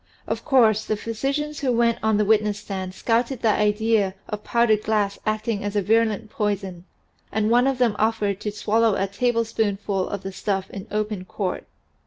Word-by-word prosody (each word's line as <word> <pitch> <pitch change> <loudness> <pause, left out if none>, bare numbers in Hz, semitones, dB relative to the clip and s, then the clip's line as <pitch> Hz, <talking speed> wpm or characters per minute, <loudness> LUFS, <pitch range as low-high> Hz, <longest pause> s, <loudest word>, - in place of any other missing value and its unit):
Of - - -3
course 220 -6 +4
the 215 - -2
physicians 275 +8 -3
who 270 -3 0
went 235 -1 +2
on 220 -1 +2
the 210 - +2
witness 210 -1 +2
stand 190 -3 -6
scouted 235 +3 0
the 225 - +4
idea 210 -2 +1
of 210 -1 -5
powdered 235 -3 +2
glass 210 -2 0
acting 215 -1 -1
as 205 0 -3
a 205 - +3
virulent 220 0 +1
poison 195 -4 -3 0.5
and 215 +1 +1
one 245 +2 +4
of 270 -1 +1
them 240 -4 +2
offered 210 -3 +1
to 210 - -3
swallow 215 +1 +2
a 195 - 0
tablespoonful 210 -3 -1
of 200 -1 -5
the 195 - -5
stuff 190 0 -2
in 195 - -8
open 210 -2 -2
court. 185 0 -4
215 Hz, 180 wpm, -23 LUFS, 200-230 Hz, 0.5 s, course